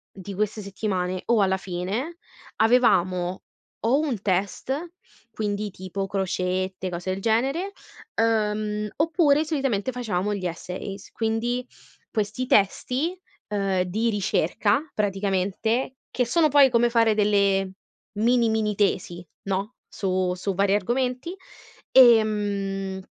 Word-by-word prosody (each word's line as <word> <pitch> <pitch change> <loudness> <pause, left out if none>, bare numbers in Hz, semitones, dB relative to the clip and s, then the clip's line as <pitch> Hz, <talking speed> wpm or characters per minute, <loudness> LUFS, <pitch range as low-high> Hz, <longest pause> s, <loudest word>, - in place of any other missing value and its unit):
di 195 +1 -8
queste 215 +2 -1
settimane, 190 -2 -3
o 235 -3 +4
alla 190 -1 +3
fine, 195 - -4 0.4
avevamo, 185 -6 +3 0.4
o 255 +5 +4
un 275 -10 -2
test, 195 +6 -1 0.6
quindi, 210 -1 -2
tipo, 190 +1 -5
crocette, 185 -1 -2
cose 180 +1 -4
del 190 - -5
genere, 270 - 0 0.4
ehm, 210 -1 0
oppure, 310 -2 +3
solitamente, 270 -8 -1
facevamo 210 -5 -2
gli 190 -2 -5
essays, 185 +3 -7
quindi, 235 +3 -1 0.4
questi 215 +4 -2
testi, 260 - +1 0.3
ehm, 195 -3 0
di 215 +6 0
ricerca, 205 - +1
praticamente, 205 +5 -1 0.2
che 250 - +1
sono 310 +7 +3
poi 280 -1 +6
come 240 0 +3
fare, 230 -2 +3
delle, 200 -2 +2 0.5
mini, 235 +1 +3
mini 220 -1 0
tesi, 180 -3 -1 0.2
no, 195 +5 -2
su 185 -2 -1
su 195 +2 -2
vari 200 +1 +3
argomenti, 250 - -1 0.6
ehm 205 -5 +3
210 Hz, 115 wpm, -25 LUFS, 190-240 Hz, 0.6 s, poi